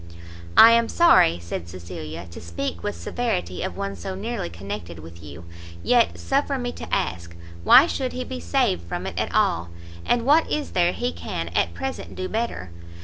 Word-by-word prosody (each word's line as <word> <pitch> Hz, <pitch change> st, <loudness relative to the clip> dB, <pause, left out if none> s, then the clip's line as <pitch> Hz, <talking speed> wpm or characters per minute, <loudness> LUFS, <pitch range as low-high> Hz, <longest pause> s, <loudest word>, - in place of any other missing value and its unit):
"I 225 Hz, -, +10 dB
am 230 Hz, 0 st, +3 dB
sorry," 335 Hz, -, +5 dB
said 85 Hz, 0 st, -6 dB
Cecilia, 85 Hz, -2 st, -8 dB
"to -, -, -9 dB
speak 85 Hz, 0 st, -4 dB
with -, -, -3 dB
severity 90 Hz, -, -3 dB
of -, -, -4 dB
one 200 Hz, 0 st, -3 dB
so 190 Hz, -1 st, -6 dB
nearly 210 Hz, -, -4 dB
connected 85 Hz, -1 st, -7 dB
with 85 Hz, +2 st, -12 dB
you, 75 Hz, +2 st, -11 dB, 0.4 s
yet, 240 Hz, -2 st, +3 dB
suffer 275 Hz, 0 st, 0 dB
me 245 Hz, -1 st, -3 dB
to -, -, -9 dB
ask, 85 Hz, 0 st, -2 dB, 0.3 s
why 270 Hz, -, +8 dB
should 265 Hz, -6 st, -2 dB
he 255 Hz, -, -3 dB
be 85 Hz, -, -6 dB
saved 85 Hz, +1 st, +1 dB
from -, -, -4 dB
it -, -, -4 dB
at -, -, -2 dB
all? 85 Hz, +1 st, +1 dB, 0.3 s
and 235 Hz, -, +1 dB
what 305 Hz, +4 st, +4 dB
is 300 Hz, -1 st, -2 dB
there 175 Hz, -1 st, +2 dB
he 245 Hz, +6 st, -2 dB
can -, -, -5 dB
at -, -, 0 dB
present 265 Hz, 0 st, -5 dB
do 185 Hz, -, -3 dB
better? 215 Hz, -, -3 dB
100 Hz, 185 wpm, -24 LUFS, -, 0.4 s, I